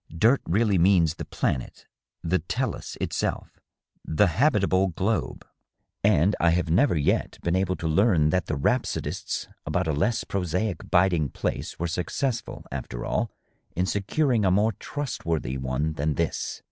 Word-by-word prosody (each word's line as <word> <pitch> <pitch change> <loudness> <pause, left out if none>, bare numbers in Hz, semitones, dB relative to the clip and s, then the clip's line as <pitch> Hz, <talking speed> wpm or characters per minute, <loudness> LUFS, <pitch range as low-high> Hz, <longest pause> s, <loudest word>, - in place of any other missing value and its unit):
Dirt 115 +10 +4
really 100 +1 +2
means 85 -3 +4
the - - -7
planet, 65 - -3 0.4
the 90 +2 +1
tdhis 80 - -3
itself, - - -3 0.4
the 80 +6 +3
habita 100 - +2
ble 95 +1 +3
globe. 95 +3 -2 0.6
And 100 -1 +4
I 85 - +4
have 85 -1 +1
never 110 - +4
yet 70 - 0
been 85 +1 +1
able 95 -1 +1
to 85 - -4
learn 80 -3 +3
that 90 +2 0
the 80 - -1
rhapsodists 70 - -1 0.2
about - - -1
a 80 - +1
less 100 +11 +1
prosaic 90 0 -2
biding 85 -5 +3
place - - -4
were 85 - -2
successful, 115 - -3
after - - -5
all, 110 +1 0 0.5
in 90 - +1
securing 110 +5 +1
a 95 - +4
more 105 +4 +3
trustworthy 85 - -3
one 65 +4 -1
than 75 0 -1
this." - - -2
90 Hz, 150 wpm, -26 LUFS, 80-105 Hz, 0.6 s, Dirt